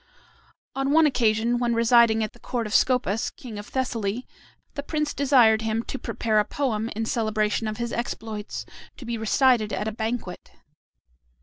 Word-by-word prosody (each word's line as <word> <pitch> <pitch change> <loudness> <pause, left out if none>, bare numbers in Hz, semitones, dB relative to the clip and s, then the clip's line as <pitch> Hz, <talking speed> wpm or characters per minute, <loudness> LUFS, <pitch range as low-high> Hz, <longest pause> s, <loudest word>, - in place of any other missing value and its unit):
On 270 0 -1
one 320 +2 +5
occasion, 235 -3 +2
when 240 -1 +1
residing 230 -1 +4
at 215 - -4
the 240 - -19
court 240 -1 -3
of 215 - -5
Scopas, 250 -4 +2
king 225 -5 -9
of 205 - -9
Thessaly, 240 -3 -2 0.5
the 285 - -4
prince 300 0 -2
desired 245 -6 +4
him 225 +1 -1
to 270 - -6
prepare 220 -2 0
a - - +4
poem 225 -2 -2
in 225 +1 -2
celebration 215 -1 0
of 215 0 -4
his 235 -1 -3
exploits, 220 -3 -5 0.3
to 255 - -10
be 235 0 -3
recited 225 0 +2
at 210 +2 -2
a - - -1
banquet. 220 -3 -5
230 Hz, 170 wpm, -25 LUFS, 215-250 Hz, 0.5 s, one